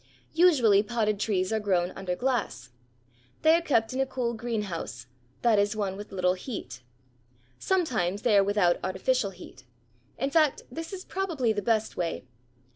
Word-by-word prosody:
Usually 275 Hz, -, +5 dB
potted 215 Hz, -1 st, -1 dB
trees 190 Hz, -2 st, 0 dB
are 220 Hz, -, +1 dB
grown 185 Hz, -4 st, 0 dB
under 185 Hz, -2 st, -4 dB
glass. 235 Hz, -, -2 dB, 0.7 s
They 315 Hz, +1 st, +6 dB
are 335 Hz, -, +4 dB
kept 240 Hz, -8 st, +1 dB
in 260 Hz, -, -3 dB
a -, -, +2 dB
cool 245 Hz, -3 st, -2 dB
greenhouse, 210 Hz, -, -4 dB, 0.4 s
that 230 Hz, -4 st, +4 dB
is 205 Hz, +2 st, +1 dB
one 200 Hz, -3 st, -2 dB
with 205 Hz, +2 st, -9 dB
little 180 Hz, -1 st, +1 dB
heat. 180 Hz, -, -7 dB, 0.8 s
Sometimes 220 Hz, -, 0 dB
they 230 Hz, -4 st, +3 dB
are 200 Hz, -, +6 dB
without 195 Hz, -3 st, +2 dB
artificial 200 Hz, +4 st, 0 dB
heat. 155 Hz, -8 st, -13 dB, 0.5 s
In 270 Hz, +3 st, -1 dB
fact 305 Hz, -2 st, +2 dB
this 325 Hz, +6 st, -6 dB
is 380 Hz, -1 st, -7 dB
probably 325 Hz, -, -1 dB
the 205 Hz, -, -2 dB
best 220 Hz, 0 st, 0 dB
way. 170 Hz, -6 st, -3 dB
215 Hz, 160 wpm, -27 LUFS, 190-260 Hz, 0.8 s, They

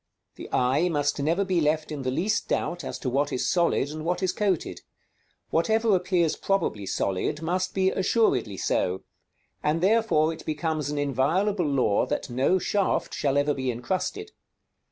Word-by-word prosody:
The -, -, -10 dB
eye 135 Hz, +8 st, +2 dB
must 145 Hz, -2 st, 0 dB
never 165 Hz, +7 st, +1 dB
be 185 Hz, -3 st, +1 dB
left 155 Hz, +1 st, 0 dB
in 150 Hz, -2 st, -4 dB
the 130 Hz, -, -1 dB
least 200 Hz, +11 st, 0 dB
doubt 175 Hz, -2 st, -2 dB
as -, -, -5 dB
to -, -, -6 dB
what 140 Hz, +3 st, 0 dB
is 125 Hz, -, -1 dB
solid 170 Hz, -5 st, +1 dB
and 155 Hz, 0 st, -6 dB
what 180 Hz, +3 st, -1 dB
is 185 Hz, -1 st, +1 dB
coated. 195 Hz, -5 st, -1 dB, 0.7 s
Whatever 220 Hz, +5 st, +2 dB
appears 180 Hz, -3 st, +1 dB
probably 110 Hz, -, -1 dB
solid, 100 Hz, -, -1 dB
must 185 Hz, +3 st, -1 dB
be 190 Hz, 0 st, +2 dB
assuredly 190 Hz, -, +1 dB
so, 95 Hz, +1 st, -1 dB, 0.6 s
and 150 Hz, +2 st, +1 dB
therefore 190 Hz, -5 st, +3 dB
it 160 Hz, -, -11 dB
becomes 155 Hz, -2 st, -2 dB
an 150 Hz, -, -3 dB
inviolable 155 Hz, -, +1 dB
law 130 Hz, -8 st, +2 dB
that 145 Hz, -3 st, -3 dB
no 130 Hz, +9 st, +2 dB
shaft 195 Hz, +2 st, 0 dB
shall 140 Hz, -1 st, 0 dB
ever 145 Hz, +1 st, +2 dB
be 130 Hz, -2 st, -2 dB
incrusted. 185 Hz, -, -3 dB
160 Hz, 165 wpm, -26 LUFS, 140-185 Hz, 0.7 s, therefore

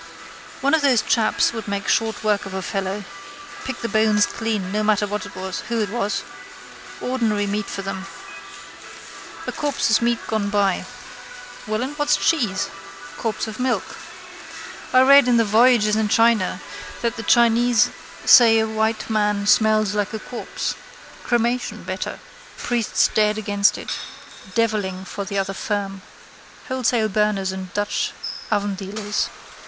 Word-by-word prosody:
One 280 Hz, +3 st, +2 dB
of 320 Hz, -, +4 dB
those 265 Hz, -5 st, +3 dB
chaps 225 Hz, 0 st, +2 dB
would 225 Hz, -2 st, -6 dB
make 200 Hz, -1 st, -3 dB
short 220 Hz, -1 st, 0 dB
work 205 Hz, -2 st, +1 dB
of 190 Hz, -, -7 dB
a 190 Hz, -, -3 dB
fellow. 195 Hz, +1 st, -3 dB, 0.6 s
Pick 265 Hz, -, -5 dB
the 230 Hz, -, -2 dB
bones 215 Hz, -2 st, +3 dB
clean 215 Hz, -5 st, -3 dB
no 210 Hz, +1 st, 0 dB
matter 210 Hz, -1 st, +2 dB
who 205 Hz, +2 st, -4 dB
it 210 Hz, -, -1 dB
was. 210 Hz, -3 st, -1 dB, 0.8 s
Ordinary 225 Hz, -5 st, 0 dB
meat 205 Hz, 0 st, -2 dB
for 195 Hz, -, -5 dB
them. 195 Hz, 0 st, -5 dB, 1.4 s
A -, -, -3 dB
corpse 290 Hz, -6 st, -1 dB
is 220 Hz, -, +4 dB
meat 235 Hz, 0 st, +2 dB
gone 215 Hz, -2 st, -1 dB
bad. 200 Hz, -2 st, +1 dB, 0.8 s
Well 215 Hz, +2 st, -1 dB
and 280 Hz, +3 st, -5 dB
what's 295 Hz, 0 st, +3 dB
cheese? 235 Hz, -, +1 dB, 0.5 s
Corpse 225 Hz, +3 st, -3 dB
of 220 Hz, +2 st, -7 dB
milk. 255 Hz, 0 st, -1 dB, 1.0 s
I 255 Hz, -, +6 dB
read 275 Hz, 0 st, +7 dB
in 245 Hz, -1 st, +4 dB
that 230 Hz, -, +3 dB
Voyages 215 Hz, 0 st, +4 dB
in 220 Hz, -1 st, +1 dB
China 225 Hz, -3 st, +2 dB, 0.4 s
that 235 Hz, -1 st, 0 dB
the -, -, -5 dB
Chinese 235 Hz, -1 st, +4 dB, 0.3 s
say 230 Hz, -2 st, +8 dB
a 220 Hz, -, +2 dB
white 220 Hz, 0 st, -1 dB
man 210 Hz, -2 st, 0 dB
smells 215 Hz, -1 st, +3 dB
like 205 Hz, 0 st, -1 dB
a -, -, -4 dB
corpse. 240 Hz, +2 st, -4 dB, 0.5 s
Cremation 240 Hz, +1 st, -1 dB
better. -, -, -5 dB, 0.4 s
Priests 235 Hz, -3 st, +1 dB
dead 210 Hz, 0 st, +2 dB
against 205 Hz, -1 st, +2 dB
it. -, -, -5 dB, 0.6 s
Devilling 205 Hz, -5 st, 0 dB
for 200 Hz, +1 st, -5 dB
the 200 Hz, 0 st, -4 dB
other 195 Hz, 0 st, -1 dB
firm. 195 Hz, -1 st, -3 dB, 0.7 s
Wholesale 245 Hz, -3 st, +1 dB
burners 205 Hz, -2 st, 0 dB
and 190 Hz, -1 st, -7 dB
Dutch 205 Hz, 0 st, -1 dB, 0.4 s
oven 205 Hz, 0 st, 0 dB
dealers. 205 Hz, +2 st, -3 dB
215 Hz, 145 wpm, -22 LUFS, 200-235 Hz, 1.4 s, say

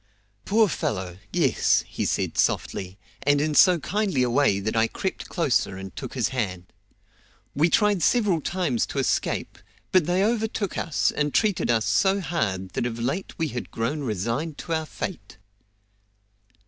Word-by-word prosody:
"Poor 220 Hz, +2 st, +4 dB
fellow; 95 Hz, -, -3 dB
yes!" -, -, +2 dB
he -, -, -3 dB
said -, -, -1 dB
softly, 95 Hz, 0 st, -1 dB, 0.2 s
and 145 Hz, +1 st, +3 dB
in 150 Hz, +1 st, 0 dB
so 180 Hz, +4 st, +6 dB
kindly 195 Hz, -6 st, 0 dB
a 125 Hz, -, 0 dB
way 125 Hz, -6 st, +3 dB
that 110 Hz, +3 st, -2 dB
I 110 Hz, 0 st, +3 dB
crept -, -, -4 dB
closer 95 Hz, -, 0 dB
and 95 Hz, 0 st, -8 dB
took -, -, -7 dB
his 125 Hz, -4 st, +1 dB
hand. 95 Hz, -9 st, -4 dB, 0.8 s
"We 155 Hz, +4 st, +3 dB
tried 210 Hz, -1 st, +3 dB
several 200 Hz, -3 st, +2 dB
times 160 Hz, -9 st, -1 dB
to -, -, -7 dB
escape, -, -, -1 dB, 0.3 s
but 185 Hz, -5 st, +4 dB
they 180 Hz, +2 st, +2 dB
overtook 220 Hz, -3 st, -1 dB
us, 155 Hz, -, 0 dB
and 150 Hz, -1 st, -1 dB
treated 210 Hz, -, +2 dB
us 115 Hz, -2 st, +2 dB
so 195 Hz, 0 st, +2 dB
hard 110 Hz, -, -2 dB
that 120 Hz, -, -2 dB
of 115 Hz, -1 st, -5 dB
late 135 Hz, +11 st, -3 dB
we 160 Hz, -2 st, -1 dB
had 125 Hz, -1 st, -5 dB
grown 115 Hz, +7 st, -2 dB
resigned 120 Hz, -, -2 dB
to 170 Hz, -, -3 dB
our 160 Hz, -1 st, -1 dB
fate." 100 Hz, -, -6 dB
145 Hz, 160 wpm, -25 LUFS, 110-185 Hz, 0.8 s, so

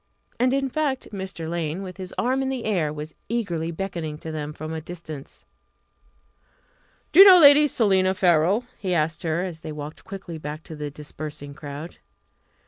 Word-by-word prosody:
And, 250 Hz, +1 st, +3 dB
in 275 Hz, 0 st, +1 dB
fact, 270 Hz, -1 st, -2 dB
Mr. 190 Hz, -5 st, -5 dB
Lane, 170 Hz, +2 st, -2 dB
with 185 Hz, -1 st, -8 dB
his 185 Hz, -1 st, -7 dB
arm 260 Hz, +2 st, +1 dB
in 265 Hz, -, -1 dB
the 260 Hz, -3 st, -3 dB
air, 175 Hz, -9 st, +1 dB
was 150 Hz, +1 st, -7 dB, 0.2 s
eagerly 180 Hz, -9 st, -1 dB
beckoning 170 Hz, -3 st, -4 dB
to 160 Hz, +1 st, -7 dB
them 150 Hz, -1 st, -4 dB
from 155 Hz, +1 st, -7 dB
the 160 Hz, 0 st, -4 dB
distance. 155 Hz, -4 st, -9 dB, 1.7 s
"Do 330 Hz, -, +4 dB
you 390 Hz, -, +13 dB
know 370 Hz, -2 st, +10 dB
Lady 295 Hz, -1 st, +8 dB
Selina 190 Hz, -7 st, +2 dB
Farrell?" 180 Hz, +6 st, +3 dB
he 185 Hz, -3 st, -1 dB
asked 155 Hz, 0 st, 0 dB
her, 165 Hz, +1 st, 0 dB
as 175 Hz, -4 st, -5 dB
they 155 Hz, -, -7 dB
walked 150 Hz, +1 st, -8 dB
quickly 190 Hz, -4 st, -8 dB
back 150 Hz, +1 st, -6 dB
to 160 Hz, -, -9 dB
the 150 Hz, -1 st, -4 dB
dispersing 145 Hz, 0 st, -8 dB
crowd. 145 Hz, +3 st, -8 dB
170 Hz, 175 wpm, -24 LUFS, 155-205 Hz, 1.7 s, you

